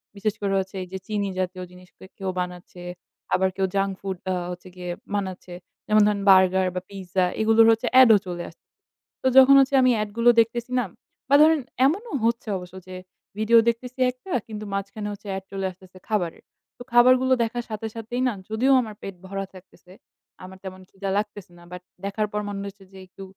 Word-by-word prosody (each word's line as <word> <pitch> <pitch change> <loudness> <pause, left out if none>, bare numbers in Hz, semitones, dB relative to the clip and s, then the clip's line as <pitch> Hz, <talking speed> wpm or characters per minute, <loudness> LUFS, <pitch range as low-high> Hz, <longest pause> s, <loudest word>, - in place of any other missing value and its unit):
বিশেষ 205 +1 -2
করে 200 -1 0
হচ্ছে 190 +1 -5
এই 185 - -10
যে - - -2
চিনি 205 -2 -1
জাতীয় 185 0 -3
জিনিস 180 0 -16 0.3
কেউ 190 -1 -3
বানাচ্ছে 180 0 -6 0.5
আবার 190 0 +3
কেউ 195 - +1
junk 195 0 +1
food 190 -2 -4
আ - - +1 0.2
হচ্ছে 180 +1 -9
গিয়ে 180 -1 -7 0.3
বানাচ্ছে। 190 -2 -4 0.3
যেমন 215 0 +4
ধরেন 205 -1 0
burger 190 0 +5
বা 180 - -2
pizza 190 -2 -2 0.2
এগুলোর 225 +1 +5
হচ্ছে 225 +2 0
ad 255 - +7
ও - - +6
চলে 175 -1 -4
আসছে। 165 - -22 0.6
তো - - +1
যখন 265 +1 +9
হচ্ছে 270 0 +3
আমি 255 -1 +5
ad 210 - -3
গুলো 235 +1 +5
দেখতেছি 235 +2 0
না? - - +1 0.5
বা 285 - +6
ধরেন 315 0 +5 0.3
এমনও 405 - 0
হচ্ছে 235 -1 0
অবশ্য 180 0 -11
যে 185 - -8 0.4
video 220 +2 +4
দেখতেছি 250 +2 -5
একটা 255 +9 -13 0.2
কিন্তু 215 -1 -7
মাঝখানে 200 +1 -4
হচ্ছে 205 - -12
ad 190 - -7
চলে 195 -1 -3
আসতেছে 185 0 -18
খাবারের। 185 -6 -2 0.3
তো - - -9
খাবারগুলো 255 +2 +5
দেখার 240 +1 -3
সাথে 215 +1 -4
সাথেই 230 +2 -4
না 250 - 0 0.2
যদিও 230 +5 +2
আমার 215 -3 -7
পেট 195 - -7
ভরা 195 0 -4
থাকতেছে, 185 -1 -17 0.5
আমার 185 +1 -10
তেমন 185 0 -8
খিদা 195 0 -5
লাগতেছে 205 -3 -4
না 175 - -16
but 180 0 -8 0.2
দেখার 210 +2 -1
পর 210 - -2
মনে 200 -1 -5
হচ্ছে 195 0 -17
যে 190 - -12
একটু 195 +1 -12
200 Hz, 195 wpm, -24 LUFS, 185-230 Hz, 0.6 s, যখন